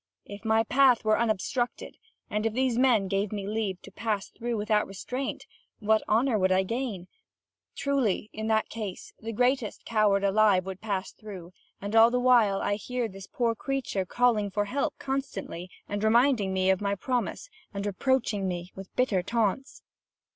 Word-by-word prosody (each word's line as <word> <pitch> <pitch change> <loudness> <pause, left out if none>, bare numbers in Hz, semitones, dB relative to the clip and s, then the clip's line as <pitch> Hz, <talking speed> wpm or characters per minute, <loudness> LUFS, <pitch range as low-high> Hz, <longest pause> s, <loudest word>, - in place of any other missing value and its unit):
If 205 +1 -10
my 220 0 +3
path 250 -1 +4
were 215 0 +3
unobstructed, 235 +3 -1 0.3
and 210 +1 -1
if 220 - -3
these 255 0 +1
men 240 -6 +3
gave 195 +1 -1
me 205 -2 -4
leave 205 -3 -2
to - - -11
pass 215 -3 -2
through 235 0 -3
without 210 0 +1
restraint, 250 +7 -5 0.3
what 215 0 +2
honour 230 +1 +3
would 185 0 +2
I 190 +1 +4
gain? 225 -4 -3 0.7
Truly, 270 -8 0
in 220 +1 -4
that 220 -1 +2
case 210 -5 -6
the 225 +1 -5
greatest 245 0 0
coward 210 -3 +2
alive 200 -2 +4
would 190 -1 -6
pass 200 -3 -2
through; 185 -5 -10 0.3
and 205 +2 -4
all 225 +1 +8
the 250 +1 0
while 235 -6 +4
I 205 - 0
hear 250 +2 -3
this 195 -2 -11
poor 235 -2 0
creature 260 -5 -2
calling 215 +1 +2
for 205 +1 -1
help 270 +7 -2
constantly, 265 -9 -4 0.2
and 205 +1 -3
reminding 230 -2 +3
me 190 0 +2
of 190 - 0
my 200 0 0
promise, 250 - -2 0.2
and 200 -1 -4
reproaching 210 -1 0
me 175 0 -4
with 195 0 -11
bitter 225 -8 +2
taunts." 230 +6 -1
215 Hz, 170 wpm, -28 LUFS, 195-245 Hz, 0.7 s, all